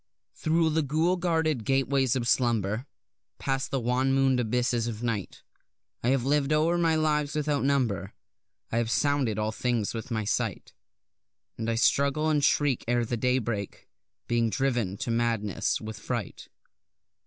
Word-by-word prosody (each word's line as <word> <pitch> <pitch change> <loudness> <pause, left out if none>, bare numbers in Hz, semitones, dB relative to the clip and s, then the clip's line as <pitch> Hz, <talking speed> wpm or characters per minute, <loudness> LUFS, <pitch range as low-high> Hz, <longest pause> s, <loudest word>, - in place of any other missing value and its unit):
Thro' 160 +1 +1
the 160 +1 +1
ghoul 155 +5 +1
guarded 160 -7 0
gateways 135 0 +1
of 120 -2 -1
slumber, 115 -1 +1 0.5
Past 135 -1 -2
the 135 - -1
wan 125 +2 +1
moon'd 135 -1 +3
abysses 120 0 0
of 115 0 -5
night, 115 -5 -3 0.6
I - - -2
have 130 -2 +1
liv'd 145 0 +1
o'er 160 +3 +2
my 165 -2 +3
lives 150 -2 0
without 150 -2 0
number, 130 -8 0 0.6
I 115 - +1
have 115 -1 -1
sounded 140 -4 +1
all 110 0 0
things 115 -2 -1
with 115 +1 -6
my 110 -3 -1
sight; - - -2 0.8
And 115 0 -3
I 115 - +1
struggle 140 +6 +2
and 150 -2 +1
shriek 145 -3 +2
ere 120 0 +1
the 120 - -2
daybreak, 115 -4 -2 0.4
being 115 -1 +1
driven 120 -7 -1
to 115 - -3
madness 115 -4 0
with 110 -1 -7
fright. 115 -4 -5
125 Hz, 155 wpm, -27 LUFS, 115-145 Hz, 0.8 s, moon'd